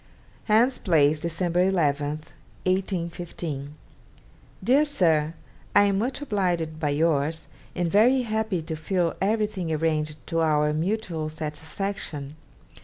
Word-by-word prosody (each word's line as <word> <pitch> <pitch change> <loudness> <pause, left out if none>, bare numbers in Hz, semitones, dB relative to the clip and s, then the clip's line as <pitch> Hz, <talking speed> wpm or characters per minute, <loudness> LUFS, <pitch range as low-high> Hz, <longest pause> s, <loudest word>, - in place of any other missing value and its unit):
'Hans 235 +4 +3
Place, 155 -4 +3
December 170 +2 0
11 150 -6 +2 0.6
(1815). 170 -6 -2 0.9
'DEAR 275 +4 +5
SIR, 165 - +2 0.4
I 205 - +8
am 200 -1 +2
much 260 +6 -2
obliged 175 - -1
by 150 -2 0
yours, 155 +1 +1 0.3
and 175 -1 0
very 245 +6 +5
happy 220 -6 -1
to 160 0 -4
feel 170 +2 0
everything 210 -4 0
arranged 155 -3 -1
to 165 - -1
our 150 -2 +2
mutual 165 -2 -2
satisfaction. 155 -1 -5
170 Hz, 110 wpm, -25 LUFS, 155-200 Hz, 0.9 s, I